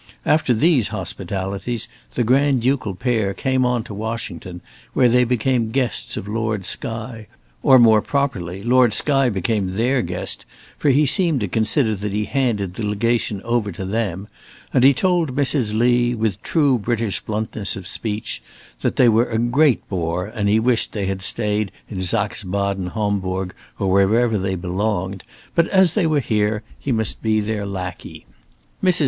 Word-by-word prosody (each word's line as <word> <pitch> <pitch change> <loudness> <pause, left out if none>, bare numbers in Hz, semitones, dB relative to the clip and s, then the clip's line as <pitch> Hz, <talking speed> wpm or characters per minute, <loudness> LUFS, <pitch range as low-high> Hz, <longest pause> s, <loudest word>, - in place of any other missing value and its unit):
After 155 -4 +2
these 135 - +3
hospitalities 100 +2 -4 0.3
the - - +1
Grand 130 +1 +2
ducal 125 -7 0
pair 110 -2 -1
came 130 +2 0
on 125 -2 +1
to 110 - -9
Washington, 105 -4 -5 0.3
where 125 - +4
they 125 +1 +4
became 125 -1 0
guests 125 -1 -1
of 100 - -6
Lord 110 -2 -2
Skye, 110 +1 -3 0.3
or, 135 -2 +6
more 110 -3 +6
properly, 100 -10 -2
Lord 125 -1 +4
Skye 135 -3 +3
became 100 -1 -1
their 125 +6 +1
guest, - - -4 0.4
for 145 - +2
he 145 +3 +4
seemed 165 -1 +2
to 105 - -1
consider 110 - +1
that 105 0 -4
he 105 +1 -1
handed 110 -7 -1
the 110 - -6
Legation 105 -1 -1
over 115 -3 0
to 95 +2 -6
them, 100 -2 -2 0.5
and 125 - +3
he 135 - +8
told 170 -2 +1
Mrs. 130 -6 +1
Lee, 120 +1 +2
with 110 -3 -2
true 145 -6 +2
British 115 -1 -1
bluntness 110 -1 -1
of 95 - -8
speech, 105 - -3 0.4
that - - -1
they 125 - +5
were 115 +1 +3
a 110 - -1
great 125 +4 +2
bore 90 -1 -2
and 105 -1 -2
he 110 +2 +4
wished 120 0 +1
they 100 -3 -2
had 95 0 -3
stayed 105 +1 +2 0.2
in 95 -3 -4
Saxe 105 +2 +1
Baden 100 -1 -2
Hombourg, 95 -3 -2 0.3
or 95 -1 0
wherever 105 +3 +3
they 95 0 -1
belonged, 95 +1 -2 0.3
but 170 -1 +3
as 190 -4 +4
they 195 -6 +2
were 150 -2 +2
here, 105 -2 0 0.2
he 140 - -3
must 110 -3 -1
be 110 -1 +1
their 105 -1 -3
lackey. 90 -2 -7 0.6
Mrs. 185 -2 +3
110 Hz, 165 wpm, -20 LUFS, 100-125 Hz, 0.6 s, he